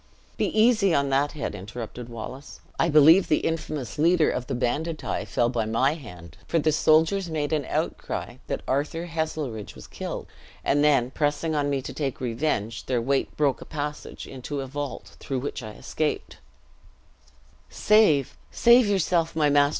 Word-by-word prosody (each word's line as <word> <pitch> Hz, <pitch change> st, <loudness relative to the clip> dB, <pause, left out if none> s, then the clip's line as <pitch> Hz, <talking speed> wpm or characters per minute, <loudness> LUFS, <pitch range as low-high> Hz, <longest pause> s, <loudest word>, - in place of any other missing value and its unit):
"Be -, -, 0 dB
easy 215 Hz, -6 st, +4 dB
on 140 Hz, 0 st, +1 dB
that 140 Hz, +2 st, +1 dB
head," 150 Hz, -, -4 dB
interrupted 115 Hz, +4 st, -7 dB
Wallace: 125 Hz, +4 st, -8 dB, 0.2 s
"I 170 Hz, -, +3 dB
believe 160 Hz, +5 st, +7 dB
the 150 Hz, -, +2 dB
infamous 155 Hz, -6 st, -3 dB
leader 165 Hz, 0 st, +4 dB
of 125 Hz, -, -4 dB
the -, -, -2 dB
banditti 150 Hz, +6 st, -2 dB
fell 120 Hz, -, +1 dB
by 120 Hz, -2 st, -1 dB
my 120 Hz, +6 st, +2 dB
hand, 90 Hz, -, -11 dB
for 170 Hz, -, +1 dB
the 155 Hz, 0 st, +2 dB
soldiers 160 Hz, +4 st, +3 dB
made 155 Hz, -1 st, -2 dB
an 150 Hz, -3 st, 0 dB
outcry -, -, -3 dB
that -, -, -3 dB
Arthur 150 Hz, +5 st, -1 dB
Heselrigge 155 Hz, -9 st, -4 dB
was -, -, -11 dB
killed; -, -, -6 dB, 0.4 s
and 145 Hz, +1 st, +2 dB
then 135 Hz, -4 st, +3 dB
pressing 150 Hz, +3 st, 0 dB
on 145 Hz, -1 st, 0 dB
me 135 Hz, -2 st, -1 dB
to -, -, -6 dB
take 140 Hz, -4 st, -3 dB
revenge, 115 Hz, -3 st, -2 dB
their 125 Hz, -2 st, +1 dB
weight 135 Hz, +4 st, -1 dB
broke 145 Hz, -3 st, +1 dB
a -, -, -8 dB
passage 150 Hz, -1 st, -5 dB
into 135 Hz, +2 st, -5 dB
a -, -, -4 dB
vault, 140 Hz, +1 st, -6 dB
through 135 Hz, -, -3 dB
which 135 Hz, +1 st, -4 dB
I 110 Hz, -2 st, -8 dB
escaped 155 Hz, +6 st, -3 dB, 0.7 s
" 65 Hz, +2 st, -32 dB
"Save, 205 Hz, -, +3 dB
save 235 Hz, -1 st, +5 dB
yourself, 175 Hz, -4 st, +1 dB
my 150 Hz, -2 st, +3 dB
master!" 145 Hz, 0 st, +5 dB
145 Hz, 170 wpm, -25 LUFS, 125-160 Hz, 0.7 s, believe